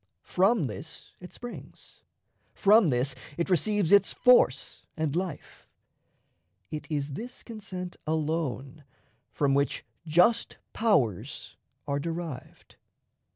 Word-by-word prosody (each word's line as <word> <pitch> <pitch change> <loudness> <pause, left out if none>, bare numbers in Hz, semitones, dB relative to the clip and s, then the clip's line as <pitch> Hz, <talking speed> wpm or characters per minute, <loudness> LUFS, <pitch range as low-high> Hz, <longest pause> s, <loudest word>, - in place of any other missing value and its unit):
From 195 +1 +2
this 140 +5 -7
it 180 - -11
springs; 245 0 -11 0.5
from 210 -1 +5
this 130 +1 +1 0.2
it 170 +3 -1
receives 195 +1 +2
its 200 0 +6
force 250 0 +4 0.2
and 155 -2 -1
life. 180 -3 -5 1.0
It 155 - -5
is 145 -2 -2
this 245 - -7
consent 185 -6 -7
alone 155 -3 -2 0.5
from 140 -2 +1
which 140 -1 0 0.2
"just 180 +9 +3 0.2
powers" 135 - 0 0.3
are 140 0 0
derived. 165 -3 -6
165 Hz, 105 wpm, -28 LUFS, 140-200 Hz, 1.0 s, its